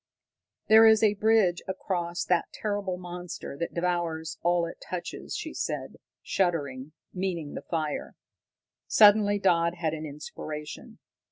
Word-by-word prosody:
"There 220 +1 +8
is 220 0 +5
a 210 -1 +5
bridge 210 -4 +3
across 175 -2 -2
that 175 -2 +1
terrible 205 -3 -3
monster 175 -4 -7
that 170 - -3
devours 170 -2 -2
all 175 0 +2
it 170 - -9
touches," 180 -1 -6
she - - -5
said, - - -4 0.3
shuddering, 145 -6 -1 0.2
meaning 180 -5 -3
the - - -5
fire. 155 -3 -3 0.7
Suddenly 205 -1 +6
Dodd 170 -3 +2
had 165 -3 -1
an 155 0 -5
inspiration. 150 +1 -8
175 Hz, 125 wpm, -28 LUFS, 160-195 Hz, 0.7 s, There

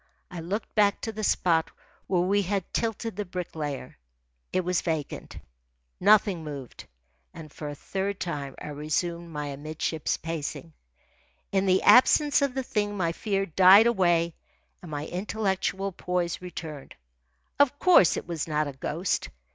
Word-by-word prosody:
I 180 - -6
looked 190 +7 -4
back 205 -1 +3
to 225 - -3
the 215 0 -6
spot 165 -5 +2 0.4
where 180 -2 +2
we 200 +3 +2
had 195 -1 -3
tilted 225 -1 -2
the 210 - -2
Bricklayer. 160 - -5 0.5
It 185 - +1
was 180 -1 +1
vacant. 160 -4 -4 0.6
Nothing 200 -3 +4
moved. 140 -5 -8 0.5
And 155 -3 -10
for 150 - -6
a 145 - -6
third 195 +5 -3
time 140 -6 -4
I - - -7
resumed 170 +4 -2
my 150 -2 -4
amidships 155 +2 -3
pacing. 165 0 -5 0.8
In 195 0 +1
the 185 0 +3
absence 285 +3 +6
of 280 -2 0
the 265 - -1
thing 205 -5 -2
my 170 -3 +1
fear 195 +2 -1
died 190 +5 +7
away 175 -7 +2 0.5
and 175 - -10
my 150 0 -4
intellectual 195 0 -2
poise 180 -1 -2
returned. 160 -5 -8 0.6
Of 285 0 +4
course 340 - +5
it - - -5
was 165 -3 -3
not 150 -1 0
a 140 - -6
ghost. 160 +7 -2
180 Hz, 150 wpm, -27 LUFS, 155-200 Hz, 0.8 s, died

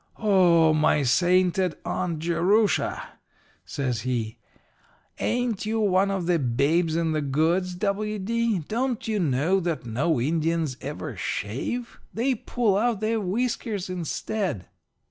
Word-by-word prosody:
"'O 175 -7 +4
my 150 -1 +3
sainted 180 +4 +2
Aunt 170 -3 -2
Jerusha!' 175 +6 +1 0.5
says 125 -6 -2
he, 115 -3 -3 0.8
'ain't 240 -4 -1
you 225 +1 0
one 195 -2 +3
of 195 -3 -2
the 175 -1 +2
Babes 145 +6 +1
in 165 -1 0
the 155 -1 0
Goods, 165 +6 0
W. 210 +3 -1
D.? 230 +2 0
Don't 240 0 -2
you 215 -2 0
know 160 +4 +2
that 170 -7 -3
no 135 +7 0
Indians 160 +1 0
ever 145 -2 -5
shave? 125 - -4 0.2
They 255 +4 +1
pull 230 -3 0
out 230 -2 +1
their 220 +1 0
whiskers 210 -1 -2
instead.' 180 - -3
180 Hz, 125 wpm, -25 LUFS, 155-215 Hz, 0.8 s, O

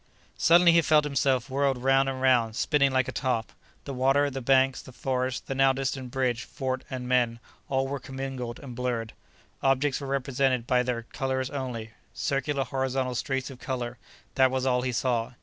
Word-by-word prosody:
Suddenly 170 +1 +6
he 170 0 +5
felt 155 -1 +4
himself 135 -3 +1
whirled 135 -1 +1
round 135 +2 +3
and 130 -1 -4
round—spinning 130 +3 +2
like 130 -1 +1
a - - -3
top. 125 -5 -1 0.3
The 140 - -5
water, 135 +3 +2
the 135 0 -5
banks, 130 +1 +3
the 130 - -13
forests, 130 -2 -2
the 135 - -5
now 135 0 +4
distant 130 -1 -3
bridge, 125 -2 0
fort 130 -1 -4
and 125 -2 -5
men, 120 -2 +2 0.3
all 135 0 +1
were 140 +1 -3
commingled 130 -3 -5
and 130 -3 -8
blurred. 120 -2 -2 0.5
Objects 135 +1 +1
were 140 - -5
represented 135 -2 0
by 125 0 +3
their 125 -2 -2
colors 130 +1 -3
only; 125 -5 -5 0.2
circular 140 0 -1
horizontal 130 0 -1
streaks 135 +2 -2
of 130 - -12
color—that 125 +1 -2
was 130 0 -1
all 125 -1 +2
he 125 0 -1
saw. 120 -1 -1
130 Hz, 175 wpm, -27 LUFS, 125-135 Hz, 0.5 s, Suddenly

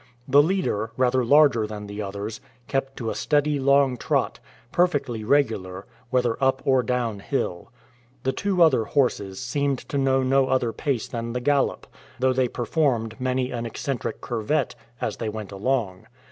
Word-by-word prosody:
The 140 +2 +6
leader, 155 - 0
rather 130 0 +2
larger 130 -4 +5
than 105 -1 -7
the 105 +1 -6
others, 100 +2 -5 0.3
kept 135 0 -2
to 115 -3 -2
a - - -2
steady 150 -1 +1
long 140 -1 +3
trot, - - 0 0.3
perfectly 140 -10 +1
regular, 105 -8 0 0.2
whether 125 0 0
up 135 0 +3
or 130 -2 +4
down 120 -4 -1
hill. 100 -6 -3 0.5
The 130 - +1
two 190 +2 +2
other 130 -9 +4
horses 105 -9 0
seemed 140 +2 -1
to 140 - -1
know 135 -1 +2
no 135 +1 +3
other 130 -3 +1
pace 135 -6 -2
than 115 -1 -4
the 125 - -1
gallop, 140 +2 +1 0.3
though 130 +1 +2
they 130 0 +2
performed 120 -3 -1
many 130 0 0
an 120 -1 -3
eccentric 130 +3 -4
curvette 120 +6 -1 0.3
as - - -3
they 115 - -3
went 105 -2 -6
along. 100 -2 -2
130 Hz, 160 wpm, -24 LUFS, 110-140 Hz, 0.5 s, The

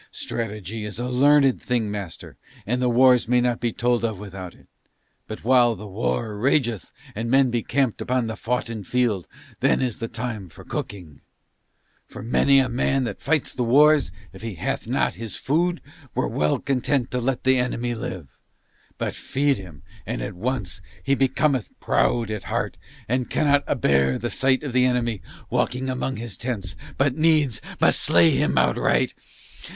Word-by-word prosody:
Strategy 105 -1 -5
is 105 -2 -5
a 120 +1 -3
learned 135 +1 +4
thing, 115 -4 -1
master, 100 -5 -7 0.3
and 125 +4 -1
the 125 - +2
wars 125 0 +5
may 125 +1 +3
not 120 -1 +1
be 120 -1 0
told 120 0 0
of 110 -3 -1
without 95 -3 -8
it, - - -22 0.6
but 110 - -7
while 120 -1 +4
the 105 - -9
war 95 - -2
rageth 120 -4 +1 0.2
and 115 +2 -3
men 135 0 +4
be 120 -1 0
camped 135 -3 0
upon 125 -1 0
the 110 -1 -4
foughten 115 -1 -3
field 115 -4 0 0.3
then - - +3
is 125 -4 -2
the 115 - -3
time 110 -5 -5
for - - -14
cooking; 85 -8 -6 0.9
for - - -9
many 135 +4 +3
a 135 -1 +4
man 130 +2 0
that 120 - -5
fights 155 -1 +1
the - - -4
wars, 145 -1 +5 0.2
if 95 - -12
he 115 -3 -5
hath - - -3
not - - +1
his 115 -3 -6
food, 170 +5 0 0.3
were - - +1
well 75 +4 +1
content 135 -1 0
to 125 - -1
let 125 +1 -1
the 130 0 +4
enemy 120 -1 -1
live, 95 -8 -6 0.7
but - - -2
feed 140 -2 0
him 85 -6 -12 0.2
and 120 +3 -3
at 100 - -5
once 95 -4 -3 0.2
he 135 - +1
becometh 135 -2 +1
proud 115 -3 +1
at 105 -2 -5
heart - - -2 0.3
and 125 +1 -1
cannot 145 -2 +2
a - - +1
bear 70 -1 +2
the 120 +2 -3
sight 130 0 +2
of 140 -4 -4
the 125 0 +4
enemy 120 -4 0 0.3
walking 130 +1 0
among 130 +1 -2
his 110 -3 -5
tents 100 -7 -3 0.2
but 140 -1 +2
must 155 - -6
needs 150 -8 +3 0.3
slay 85 -1 +5
him - - +1
outright. - - +2
120 Hz, 175 wpm, -23 LUFS, 105-130 Hz, 0.9 s, wars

